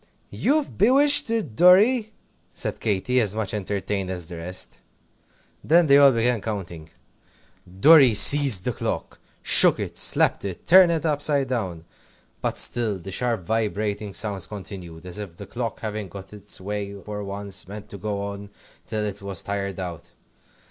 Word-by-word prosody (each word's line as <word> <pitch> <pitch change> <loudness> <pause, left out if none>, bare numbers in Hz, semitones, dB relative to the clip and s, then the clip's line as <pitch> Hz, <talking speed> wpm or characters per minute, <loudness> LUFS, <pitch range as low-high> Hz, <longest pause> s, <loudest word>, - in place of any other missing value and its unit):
"You've 295 +1 -1
bewitched 280 +6 +5
it, 215 - -3
Dorry!" 210 - +4 0.4
said - - -4
Katy, 115 +5 0
as 105 -2 -1
much 110 -3 -3
entertained 100 -1 -4
as 90 -2 -5
the 85 +1 -9
rest. 90 +3 -6 0.8
Then 170 +3 +4
they 140 -1 +5
all 140 -1 +7
began 115 -1 0
counting. 85 -7 -7 0.9
Dorry 140 -4 +6
seized 135 -5 +7
the - - -1
clock - - -5 0.2
shook - - +6
it, - - -6
slapped - - +1
it, 95 -3 -7
turned 180 0 +6
it 165 -2 -2
upside 145 -3 0
down. 95 -10 -4 0.6
But - - -3
still 115 -5 0
the 95 +2 -10
sharp, 115 0 -2
vibrating 105 0 -3
sounds 100 -4 -2
continued, 95 -5 -10
as 90 +2 -6
if 95 -5 -9
the 100 - -9
clock, 115 +2 -6
having 105 -2 -5
got 95 +2 -11
its 105 0 -7
own 95 - -14
way 100 -1 -5
for 105 +1 -7
once, 100 -1 -5
meant 105 +1 -10
to 100 - -10
go 100 0 -4
on 100 0 -8 0.4
till 110 -2 -3
it 100 0 -6
was 100 -3 -3
tired 100 -1 -4
out. 85 -2 -7
105 Hz, 160 wpm, -23 LUFS, 95-125 Hz, 0.9 s, all